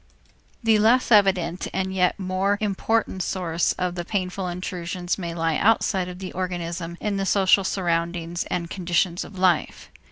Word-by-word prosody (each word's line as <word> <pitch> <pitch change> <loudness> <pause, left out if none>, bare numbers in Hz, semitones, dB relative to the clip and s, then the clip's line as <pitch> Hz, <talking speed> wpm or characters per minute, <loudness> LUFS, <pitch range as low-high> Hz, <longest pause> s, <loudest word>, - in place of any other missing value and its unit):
The 220 -1 +4
less 240 +4 +3
evident 185 -5 +3
and 190 0 -1
yet 180 -1 +2
even 195 - -6
more 190 +2 +1
important 210 -1 0
source 175 -3 0
of 180 -1 -2
the 175 -1 -4
painful 185 0 -3
intrusions 175 0 -4
may 170 -2 -4
lie 165 -1 0
outside 200 -4 +2
of 180 0 -7
the 185 0 -6
organism 175 -2 -4
in 205 -2 -2
the 195 - -1
social 195 0 +4
surroundings 170 -2 -1
and 170 -1 -3
conditions 175 0 0
of 195 - -11
life. 180 -3 +1
185 Hz, 160 wpm, -24 LUFS, 175-195 Hz, -, The